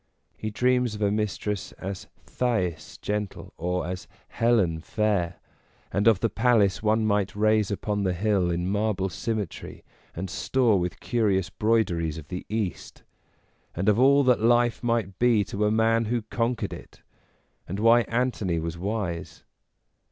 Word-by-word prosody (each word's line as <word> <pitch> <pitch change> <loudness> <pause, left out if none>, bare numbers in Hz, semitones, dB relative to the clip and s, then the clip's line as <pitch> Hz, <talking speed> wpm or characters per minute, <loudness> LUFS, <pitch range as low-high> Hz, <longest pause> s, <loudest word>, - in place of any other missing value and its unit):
He 110 - -4
dreams 125 +1 +1
of 105 - -3
a 100 - +2
mistress 105 -1 -2
as 95 0 -7 0.2
Thais 95 -10 -2
gentle 105 -1 -4
or 90 +2 -2
as 90 0 -5 0.2
Helen 105 -9 +2
fair, 90 -1 -1 0.6
and 100 +3 +1
of 110 -4 +5
the 115 - +3
palace 115 -5 +3
one 110 +1 +2
might 100 -2 0
raise 110 -1 +2
upon 105 0 -2
the 95 -2 +1
hill 100 -2 +1
in 85 +1 -1
marble 100 -1 0
symmetry 105 0 -5 0.3
and 95 +3 -4
store 115 +2 +1
with 90 0 -4
curious 100 -6 0
broideries 90 -8 0
of 75 -2 -10
the 90 0 -6
East; 105 -4 -4 0.7
and 95 +4 -2
of 105 +1 +4
all 140 +2 +5
that 125 -4 +3
life 120 +1 +3
might 115 -6 -1
be 120 -4 +4
to 100 +3 -2
a 105 - +2
man 115 +1 +2
who 115 +1 -1
conquered 115 +1 -2
it, - - -12 0.6
and 95 +3 -4
why 115 +2 +6
Antony 115 -7 0
was 85 +1 -4
wise. 95 -4 -4
105 Hz, 150 wpm, -26 LUFS, 95-115 Hz, 0.7 s, why